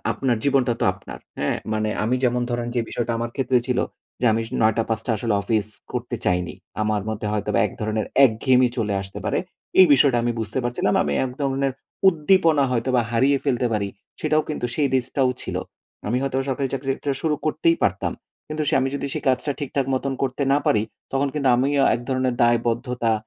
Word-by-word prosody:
আপনার 125 -4 0
জীবনটা 135 -3 +3
তো - - +2
আপনার। - - -10 0.2
হ্যাঁ? - - 0 0.2
মানে 110 0 0 0.2
আমি 125 +3 +1
যেমন 125 0 +2
ধরেন 120 0 -2
যে 120 - +2
বিষয়টা 120 -1 -2
আমার 120 0 -3
ক্ষেত্রে 130 -1 +2
ছিল 125 0 0 0.4
যে 125 - +2
আমি 115 +1 0 0.2
৯ 110 0 +4 0.2
টা 115 - 0
টা - - 0
আসলে 110 0 -1
অফিস 105 0 +1 0.3
করতে 120 -1 -3
চাইনি। 90 -1 0 0.3
আমার 105 -2 0
মধ্যে 110 0 -3
হয়তোবা 105 0 0
এক - - -8
ধরনের 110 0 -1 0.2
একঘেয়েমি 125 +2 +3
চলে 105 -3 0
আসতে 95 - -7
পারে, - - 0 0.4
এই 185 - +9
বিষয়টা 135 -2 +5
আমি 120 0 0
বুঝতে 110 +4 -3
পারছিলাম 120 0 0
আমি 70 - -1
এক 130 - -3
ধরনের 135 -1 0 0.4
উদ্দীপনা 165 -3 +3
হয়তো 125 +1 0
বা 120 - +3
হারিয়ে 135 +4 +3
ফেলতে 125 -3 +1
পারি 100 -2 0 0.3
সেটাও 155 0 +2
কিন্তু 135 -5 -2
সেই 145 -2 +2
রিস্কটাও 130 +1 +1
ছিল। - - -4 0.5
আমি 120 +4 0
হয়তোবা 135 -1 -1
সরকারি 135 0 -1
চাকরি 135 0 -3
একটা 145 - -3
শুরু 155 -2 +1
করতেই 330 - +2
পারতাম - - 0 0.4
কিন্তু 155 0 -2
সে - - +2
আমি 135 - +1
যদি 140 0 -2
সেই - - -3
কাজটা 130 +3 +1
ঠিকঠাক 140 -1 -1
মতন 135 +1 -1
করতে 135 +1 -1
না 145 - +4
পারি, 105 - +3 0.3
তখন 140 +1 +1
কিন্তু 140 -3 +1
আমিও 140 +2 +2
এক - - -3
ধরণের 130 -1 0
দায়বদ্ধতা 120 0 +1
125 Hz, 195 wpm, -23 LUFS, 115-140 Hz, 0.5 s, এই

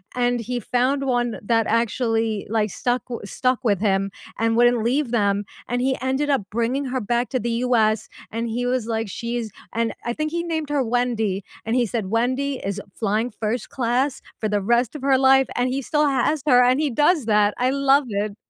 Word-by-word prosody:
and 245 -1 +1
he 245 +2 -3
found 255 +5 0
one 240 -3 0
that 225 +1 +2
actually, 225 -2 0
like, 215 -1 +1
stuck 245 +4 -1
w 240 -2 -5
stuck 255 +4 -1
with 205 -5 +2
him 195 -1 +1 0.3
and 225 0 +2
wouldn't 240 -1 +4
leave 255 +1 0
them, 205 -3 +1 0.2
and 245 +1 -1
he 265 0 +1
ended 265 +3 0
up 275 -6 +2
bringing 240 +5 0
her 260 -1 -2
back 240 +3 0
to 255 - -1
the 235 +2 -2
US, 220 -3 +2 0.2
and 230 +1 -2
he 245 +2 -2
was 250 -2 0
like, 225 -2 -2
"She's" 235 0 -4 0.2
and 230 0 0
I 240 - -1
think 310 +2 -2
he 340 0 -1
named 320 -3 -3
her 285 -3 +1
Wendy, 225 -5 0 0.2
and 225 +2 0
he 245 -2 +3
said, 220 -1 -2
"Wendy 255 +4 0
is 200 +1 -3 0.2
flying 220 +2 -1
first 220 +3 -3
class 255 +2 0 0.2
for 215 - -1
the 205 -1 0
rest 235 +5 +1
of 290 - -6
her 270 -1 +3
life," 265 0 +5
and 245 +1 +1
he 270 +2 -1
still 295 +2 +1
has 275 +2 +1
her, 250 -2 +6
and 255 +3 +3
he 305 -2 +1
does 295 +2 +2
that, 210 -1 +3
I 250 +1 +2
love 275 0 +3
it. 205 0 -2
240 Hz, 210 wpm, -22 LUFS, 225-260 Hz, 0.3 s, her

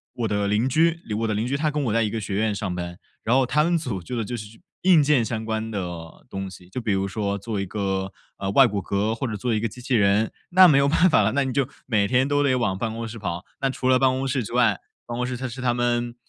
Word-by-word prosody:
我 115 -2 -1
的 100 -1 0
邻 105 +5 +1
居 165 +4 +2 0.2
我 115 - 0
的 110 - 0
邻 110 +3 -1
居 135 - -1
他 155 0 0
跟 150 -1 -1
我 110 - 0
在 115 -1 +3
一 105 - 0
个 110 +1 -3
学 100 -1 -4
院 110 0 +1
上 100 -3 -3
班。 85 0 -5 0.3
然 120 +3 +2
后 135 -1 +4
他 150 +5 +2
们 170 +1 +2
组 120 - -4
做 120 +8 -5
的 115 - -1
就 120 - -4
是 105 0 -9 0.2
硬 175 -5 +5
件 140 -5 +3
相 110 -1 -3
关 110 0 -2
的 85 -5 -6
东 95 0 -5
西， 90 -1 -13
就 125 - -5
比 110 - -1
如 95 0 0
说 100 0 -2
做 100 0 -4
一 - - -2
个， 95 -1 -2 0.3
呃， 95 0 -3
外 135 +4 +7
骨 100 -2 -2
骼， 100 +4 -1
或 125 +3 -3
者 110 - -4
做 120 +3 -1
一 110 - +1
个 115 - -1
机 125 +4 -11
器 125 - -3
人， 105 0 +3 0.2
那 185 0 +8
没 145 -4 +5
有 140 - +3
办 165 +5 +4
法 110 - +4
了， 105 +2 +2
那 140 0 +2
你 130 -2 -3
就 140 -1 0 0.2
每 105 -5 +1
天 130 +4 +2
都 145 0 +2
得 135 -3 +2
往 105 -7 0
办 110 +2 -2
公 115 0 -5
室 115 0 -8
跑。 90 -2 -4 0.2
那 135 - +1
除 130 -1 -3
了 130 -1 +5
办 130 -1 +4
公 130 +1 -1
室 130 -2 0
之 - - -8
外 - - +3 0.3
办 120 - -5
公 125 0 -1
室 125 - -3
是 125 +2 -7
他 120 -1 +1
们 120 0 0
115 Hz, 315 characters per minute, -24 LUFS, 100-130 Hz, 0.3 s, 那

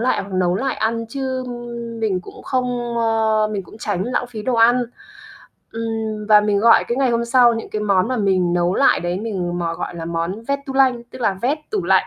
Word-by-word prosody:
lại 250 +2 +1
hoặc 195 0 -10
nấu 180 -1 +1
lại 265 +3 -1
ăn 230 +1 -1
chứ 260 0 -3 0.6
mình 200 -5 0
cũng - - -12
không, 245 -2 -2
ơ 220 -1 +2
mình 200 - -2
cũng 200 +5 -15
tránh 195 -4 -2
lãng 245 +1 -1
phí 225 -3 -7
đồ 255 - 0
ăn, 240 +2 +4 0.9
ừm, 225 -2 -3
và 210 -1 +7
mình 210 -1 +1
gọi 230 +2 +5
cái 235 - -1
ngày 265 -2 +2
hôm 235 0 +1
sau 240 0 +5
những 225 - -6
cái 215 - -3
món 200 -1 +2
mà 255 - -1
mình 185 -4 +1
nấu 175 +1 +1
lại 275 - +4
đấy 175 +3 -2
mình 180 -6 -3
mò 170 -1 -2
gọi 175 - -5
là 165 - -5
món 170 +6 -3
"vét-tu-lanh", 270 -2 +1
tức 255 - -11
là 200 -4 +2
vét 280 +5 +1
tủ 415 -3 -1
lạnh. - - +3
225 Hz, 220 wpm, -20 LUFS, 195-245 Hz, 0.9 s, và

